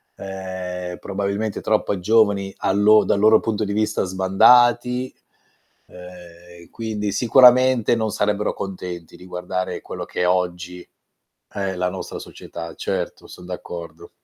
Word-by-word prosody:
ehm, 95 -2 -6
probabilmente 100 +2 -3
troppo 105 -3 0
giovani 100 -1 +2
a - - 0
lo 105 +2 +5
dal 100 - +1
loro 110 +1 +5
punto 110 -1 -2
di 100 - -3
vista 110 0 0
sbandati, 120 +7 +3 0.7
ehm, 90 -1 -14
quindi 105 -2 -4
sicuramente 125 +1 +5
non 110 -1 -1
sarebbero 105 0 0
contenti 90 -4 -7
di 90 - -14
guardare 90 0 -4
quello - - -7
che - - -3
oggi 90 -1 -2 0.6
è 95 -1 -3
la 90 0 -1
nostra 95 +1 -7
società. 85 -1 -9
Certo - - -4
son 90 - -12
d'accordo. 90 -2 -8
95 Hz, 125 wpm, -21 LUFS, 90-110 Hz, 0.7 s, lo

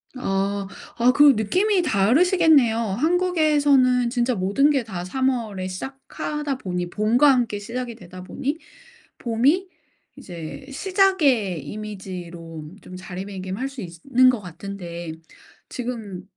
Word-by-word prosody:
아. 195 -4 -1 0.3
아 240 +1 +5
그럼 285 -1 +6
느낌이 370 - +2
다르시겠네요. 285 - +4
한국에서는 285 - +2
진짜 245 0 0
모든 200 +10 +2
게 275 -4 +1
다 185 -6 -6
3 260 +8 0
월에 215 -7 -3
시작하다 270 +6 -5
보니 180 -4 -3
봄과 225 +9 +3
함께 235 -5 0
시작이 235 +2 -5
되다 185 -1 -11
보니 280 +10 -3 0.6
봄이 270 +11 +1 0.5
이제 170 - -9
시작의 290 - +2
이미지로 175 -6 -8
좀 185 - -12
자리매김할 190 +5 -5
수 275 -4 -8
있으 170 -2 -9
는 255 0 +6
것 245 - +1
같은데 175 -2 -7 0.6
지금 225 -7 -5
230 Hz, 255 characters per minute, -23 LUFS, 190-275 Hz, 0.6 s, 그럼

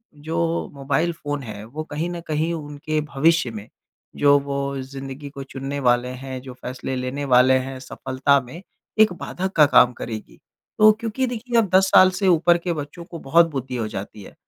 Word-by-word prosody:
जो 165 +3 -2
mobile 140 +4 0
phone 145 -3 -5
है, 105 -2 -8
वो 140 +8 -6
कहीं 155 +2 -4
न 175 -1 -5
कहीं 155 +2 0
उनके 155 0 -3 0.2
भविष्य 160 -2 +3
में 105 -2 -8 0.5
जो 145 0 +5
वो 140 0 -3
ज़िंदगी 135 +1 -8
को 140 -1 -8
चुनने 135 +1 -5
वाले 120 -1 +2
हैं, 130 +1 -7
जो 130 -1 -9
फ़ैसले 130 +1 -6
लेने 130 +3 -3
वाले 130 0 +5
हैं 130 0 -6
सफलता 135 +2 0
में, 130 +8 -11 0.4
एक 215 -4 +6
बाधक 190 +2 -4
का 150 - +7
काम 125 -3 +5
करेगी। 110 -2 -8 0.4
तो 215 0 +8
क्योंकि 230 +3 -1
देखिए, 240 0 -2
अब 220 -4 +3
10 190 0 +5
साल 185 -1 +7
से 190 +1 -1
ऊपर 175 0 +4
के 175 0 -3
बच्चों 150 +2 -7
को 170 - -9
बहुत 165 +5 +4
बुद्धि 130 -3 -5
हो 110 -2 -2
जाती 100 0 -7
है। - - -13
145 Hz, 190 wpm, -22 LUFS, 130-170 Hz, 0.5 s, तो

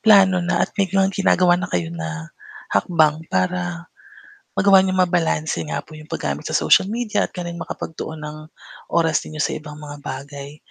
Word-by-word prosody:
plano 195 -3 +7
na 175 +1 +1
at - - -1
may 200 - +3
ginagawa 190 -1 +3
na 180 - -2
kayo 85 -2 -2
na 80 -1 -5 0.4
hakbang 155 - +3
para 175 - -1 0.7
magawa 195 -1 +7
niyong 185 -1 +2
mabalanse 165 -2 0
nga - - -1
po 155 - -14
'yong 155 0 -12
paggamit 70 +1 -2
sa - - +2
social 190 - +4
media 230 0 0
at - - -30
ganon 175 -1 -5
makapagtuon 160 0 -6
ng 150 0 -7 0.5
oras 165 -2 +2
ninyo 155 - -9
sa - - 0
ibang 150 -1 -8
mga 145 -1 -9
bagay. 140 +2 -7
165 Hz, 170 wpm, -21 LUFS, 145-185 Hz, 0.7 s, plano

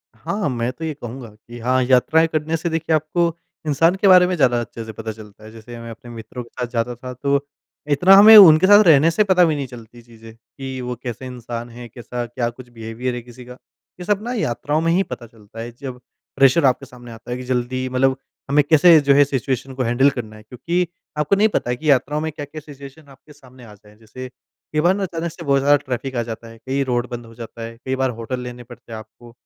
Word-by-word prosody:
हाँ, 195 - -3
मैं 120 0 -2
तो 160 - -10
ये 155 - -3
कहूँगा 120 -3 -9
कि 120 +2 -13
हाँ 130 +2 +1
यात्राएँ 135 +6 +3
करने 160 0 -2
से 170 +2 -3
देखिए 165 0 0
आपको, 165 +2 0 0.3
इंसान 165 +5 +3
के 195 +1 +1
बारे 180 -1 +7
में 180 - -1
ज़्यादा 125 -6 +2
अच्छे 115 0 -8
से 110 - -7
पता 110 +1 -6
चलता 105 -1 -14
है। 110 - -12
जैसे 115 +1 -11
मैं 115 0 -9
अपने 120 +1 -12
मित्रों 115 +2 -8
के 115 - -18
साथ 125 - -2
जाता 120 0 -2
था 125 +2 -9
तो, 140 +2 -1 0.4
इतना 180 +7 +5
हमें 215 +3 +9
उनके 175 -2 +8
साथ 205 +1 +8
रहने 160 +1 +6
से 210 +6 +2
पता 185 -3 +4
भी 160 -2 0
नहीं 140 -2 -4
चलती 120 -1 -13
चीज़ें 115 -1 -15
कि 130 +3 -9
वो 125 0 -4
कैसे 120 +1 -6
इंसान 120 -1 -7
हैं, 120 0 -11
कैसा 120 +1 -6
क्या 120 0 -3
कुछ 120 +1 -13
बिहेवियर 120 +2 -5
है 120 - -5
किसी 120 +1 -14
का, 125 0 -12 0.4
ये 180 - -7
सब 205 0 0
ना 245 - -4
यात्राओं 145 - -1
में 165 0 +1
ही 185 +3 +2
पता 120 -10 -9
चलता 110 -1 -15
है। 120 +1 -7
जब 130 -3 -7 0.4
प्रेशर 135 +3 +4
आपके 135 +1 +1
सामने 120 -2 -13
आता 115 +2 -11
है 125 - -2
कि 130 - -7
जल्दी 130 +1 -2
मतलब 130 +1 +1 0.3
हमें 145 +1 +4
कैसे 160 +1 +7
जो 140 -1 +3
है 145 - +6
सिचुएशन 135 -1 -3
को 130 - -2
हैंडल 125 +4 +3
करना 110 -5 -7
है। 110 - -14
क्योंकि 170 +10 -2 0.3
आपको 150 +6 +2
नहीं 210 +2 +4
पता 120 - -2
है 125 - 0
कि 155 +4 -3
यात्राओं 140 +3 +1
में 160 - -3
क्या-क्या 145 +1 -8
सिचुएशन 140 +1 -13
आपके 135 +3 -18
सामने 130 -3 -18
आ 105 - -13
जाएँ। 105 +1 -20
जैसे 115 +3 -10
कई 155 +3 -8
बार 175 +4 +3
ना 200 - -3
अचानक 170 -2 -4
से 170 +1 -11
बहुत 140 -1 +3
ज़्यादा 145 +2 +4
ट्रैफ़िक 130 -1 -5
आ 120 - 0
जाता 115 0 -8
है। 115 - -13
कहीं 130 +4 -2
रोड 120 -1 -1
बंद 120 -1 -7
हो 115 - -15
जाता 115 0 -10
है। 115 0 -8
कई 130 - -1
बार 130 0 0
होटल 125 +2 -4
लेने 125 0 -8
पड़ते 120 -1 -15
हैं 110 - -5
आपको। 115 +2 -15
130 Hz, 245 wpm, -20 LUFS, 120-150 Hz, 0.4 s, हमें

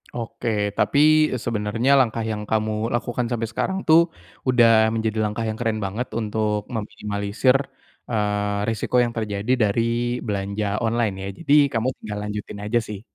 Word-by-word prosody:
Oke. 120 0 -4 0.3
Tapi, 145 - +2 0.3
eee, 130 - -2
sebenarnya 115 +3 0
langkah 115 -2 +1
yang 105 -1 -3
kamu 110 0 +1 0.2
lakukan 120 +1 -2
sampai 115 -1 -1
sekarang 190 +11 -1
tuh, 160 +1 +8 0.5
udah 125 -2 +5 0.3
menjadi 110 -1 -1
langkah 105 +2 -2
yang 110 0 -3
keren 115 -2 -1
banget 110 +6 -3
untuk 105 -1 -1
meminimalisir, 105 +3 0 0.5
eee, 105 -2 0
resiko 115 +2 -2
yang 120 -1 -2
terjadi 105 +1 -2
dari 105 +2 +2 0.5
belanja 100 +1 -2 0.2
online 115 -2 +1
,ya. - - -4
Jadi 150 -4 +1 0.2
kamu 115 +2 0
tinggal 105 -1 -6
lanjutin 105 0 -6
aja 115 +3 +2
sih. 105 -2 -7
110 Hz, 150 wpm, -23 LUFS, 105-120 Hz, 0.5 s, tuh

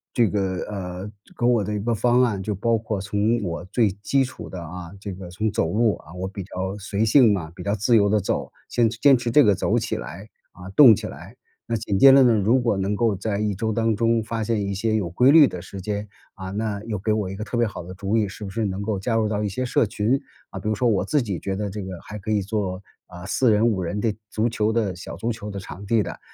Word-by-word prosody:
这 115 -3 +4
个 95 -3 -1
呃， 95 0 -6 0.3
给 120 - 0
我 120 -4 +3
的 105 - -4
一 - - -2
个 115 +3 -1
方 120 +3 +3
案， 105 -6 0
就 105 +1 -3
包 115 +4 +1
括 110 -2 -3
从 105 +3 0
我 85 -1 -4
最 105 +1 +1
基 135 +4 +2
础 130 - -9
的 90 - -7
啊， 85 +1 -8
这 100 -1 -6
个 90 -1 -9
从 105 +4 -2
走 80 - 0
路， 110 0 +2
啊， 75 - -16
我 95 +1 -4
比 100 0 -7
较 95 +1 -4
随 100 +3 -1
性 115 -1 +6
嘛， 85 -5 -2
比 90 - -9
较 100 +3 -1
自 115 +4 +2
由 100 -2 +4
地 105 0 +3
走， 95 - -2 0.2
坚 115 -2 +2
持 115 - -7
坚 140 0 +6
持 120 -1 -2
这 145 +5 +6
个 105 -3 +5
走 - - 0
起 - - -2
来， 95 +5 -8 0.3
啊， 90 +1 -11
动 125 -8 +9
起 - - -6
来。 - - -9 0.3
那 115 -1 -1
紧 100 -3 -2
接 135 +4 +8
着 135 0 +7
呢， 120 -2 +5
如 110 +5 +3
果 115 -4 +1
能 95 +2 -1
够 110 -1 +1
在 100 +1 -2
一 105 -2 -1
周 110 +3 -1
当 115 0 +1
中 115 0 +2
发 115 0 -3
现 110 -1 0
一 100 - -2
些 110 +2 0
有 90 -5 -2
规 125 +10 +4
律 155 -3 +8
的 90 - -6
时 95 +1 -9
间， 105 +2 -3 0.3
啊， 95 -1 -7
那 105 0 -3
又 110 -4 -4
给 110 +2 0
我 105 -3 -1
一 95 - -7
个 105 - -4
特 120 - -5
别 120 0 +3
好 95 -4 -6
的 90 +2 -9
主 100 +3 -1
意， 105 -2 +1
是 105 +2 -9
不 95 - -5
是 110 +3 -2
能 95 0 -3
够 100 -2 -2
加 115 +3 -1
入 110 -1 +1
到 105 -1 -1
一 105 - 0
些 115 +7 -3
社 120 -2 +2
群。 105 +6 0 0.3
啊， - - -7
比 - - -6
如 110 - +1
说 120 +2 +1
我 105 -4 +1
自 150 -3 +1
己 100 -7 -3
觉 95 -1 -3
得 105 0 -3
这 105 +1 -6
个 95 -2 -6
还 105 0 -8
可 105 - -7
以 105 -1 +2
做， 95 -2 -3 0.2
啊， 90 0 -10
4 120 +4 +2
人、 105 +2 +3
5 105 -5 +1
人 100 +4 -3
的 110 -3 +1 0.2
足 110 +3 0
球 110 0 0
的 105 -5 0
小 90 - -8
足 115 - -2
球 110 -2 -6
的 100 - -6
场 100 +1 -8
地 110 +1 +2
的， - - -7
105 Hz, 295 characters per minute, -23 LUFS, 95-115 Hz, 0.3 s, 动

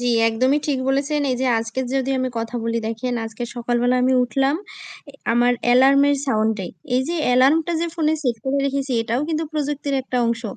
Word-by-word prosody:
জ্বি 245 0 0 0.2
একদমই 255 +6 +2
ঠিক 285 -3 0
বলেছেন। 280 +2 0
এইযে 255 +1 -1
আজকের 225 +3 -3
যদি 270 0 0
আমি 255 0 0
কথা 230 +1 -5
বলি, 230 0 -1
দেখেন 230 +2 -3
আজকে 225 +2 -7
সকালবেলা 240 +1 0
আমি 260 +1 +3
উঠলাম 270 +4 +1 0.5
এ - - -19 0.2
আমার 240 +1 +3
অ্যালার্মের 275 +3 +5
সাউন্ডে। 215 -5 0 0.3
এইযে 280 +7 -1
অ্যালার্মটা 275 +7 +3
যে 340 - 0
ফোনে 315 -2 +1
সেট 245 -4 0
করে 270 +1 0
রেখেছি 275 -1 -2
এটাও 230 +3 -1
কিন্তু 320 0 -1
প্রযুক্তির 290 -2 -2
একটা 255 -1 -4
অংশ। 230 0 -1
260 Hz, 175 wpm, -21 LUFS, 240-280 Hz, 0.5 s, অ্যালার্মের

